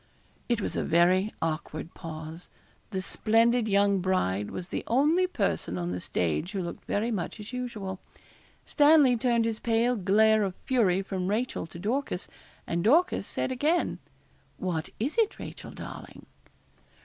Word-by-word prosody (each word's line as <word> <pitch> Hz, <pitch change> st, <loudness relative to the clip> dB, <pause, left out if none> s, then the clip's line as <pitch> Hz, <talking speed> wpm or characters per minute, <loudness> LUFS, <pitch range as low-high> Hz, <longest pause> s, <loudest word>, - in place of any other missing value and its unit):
It 235 Hz, -2 st, +2 dB
was -, -, -3 dB
a -, -, 0 dB
very 180 Hz, +5 st, +3 dB
awkward 155 Hz, 0 st, -3 dB
pause. 160 Hz, 0 st, -8 dB, 0.4 s
The 190 Hz, -3 st, -3 dB
splendid 230 Hz, +3 st, +2 dB
young 200 Hz, -1 st, +3 dB
bride 105 Hz, -, 0 dB
was 180 Hz, 0 st, -6 dB
the -, -, -3 dB
only 305 Hz, +9 st, +3 dB
person 90 Hz, -, -1 dB
on 90 Hz, 0 st, -2 dB
the 90 Hz, -, -3 dB
stage 90 Hz, -, -1 dB
who 195 Hz, -2 st, -2 dB
looked 170 Hz, -, -7 dB
very 220 Hz, +4 st, -1 dB
much 200 Hz, 0 st, -3 dB
as 210 Hz, +4 st, -9 dB
usual. 215 Hz, -7 st, -4 dB, 0.7 s
Stanley 290 Hz, -4 st, +5 dB
turned 235 Hz, -1 st, +2 dB
his 225 Hz, -1 st, -2 dB
pale 235 Hz, +2 st, +2 dB
glare 215 Hz, +2 st, +4 dB
of 195 Hz, -3 st, -1 dB
fury 195 Hz, -8 st, +2 dB
from 190 Hz, -2 st, -3 dB
Rachel 215 Hz, -3 st, -1 dB
to 165 Hz, -, -11 dB
Dorcas, 215 Hz, +1 st, -2 dB, 0.4 s
and 170 Hz, 0 st, -1 dB
Dorcas 325 Hz, -, +3 dB
said -, -, -2 dB
again, 300 Hz, +7 st, +1 dB, 0.6 s
'What 170 Hz, -4 st, -3 dB
is 280 Hz, -, -1 dB
it, 440 Hz, -2 st, +2 dB
Rachel, -, -, -8 dB
darling?' -, -, -9 dB
205 Hz, 150 wpm, -28 LUFS, 175-240 Hz, 0.7 s, Stanley